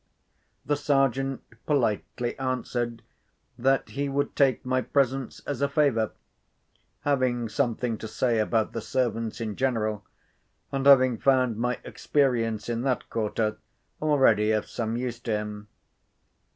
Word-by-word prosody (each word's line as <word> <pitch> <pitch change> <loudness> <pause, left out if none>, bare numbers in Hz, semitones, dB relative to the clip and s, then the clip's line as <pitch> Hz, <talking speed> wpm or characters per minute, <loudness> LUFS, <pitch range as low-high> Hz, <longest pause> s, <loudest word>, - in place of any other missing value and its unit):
The 145 - +1
Sergeant 135 -2 +1 0.2
politely 120 -3 0
answered 120 -2 -2 0.5
that 135 +2 +1
he 140 +1 -2
would 140 +1 -1
take 135 -2 +2
my 130 0 +1
presence 135 -1 0
as 145 - -3
a 140 - +2
favour, 130 -8 +2 0.9
having 130 -4 +1
something 115 +1 -1
to 110 - -6
say 120 0 +1
about 110 0 +1
the - - -3
servants 115 -4 -1
in 110 -3 -3
general, 110 -5 0 0.7
and 135 0 0
having 130 -4 +6
found 130 -4 +3
my 125 +1 0
experience 115 -7 0
in 120 -1 -1
that 130 -1 -1
quarter 110 -1 -1 0.4
already 130 -9 +4
of 110 -1 +1
some 115 0 -3
use 120 -1 -3
to 120 -2 -2
him. 105 0 -6
125 Hz, 130 wpm, -27 LUFS, 115-135 Hz, 0.9 s, having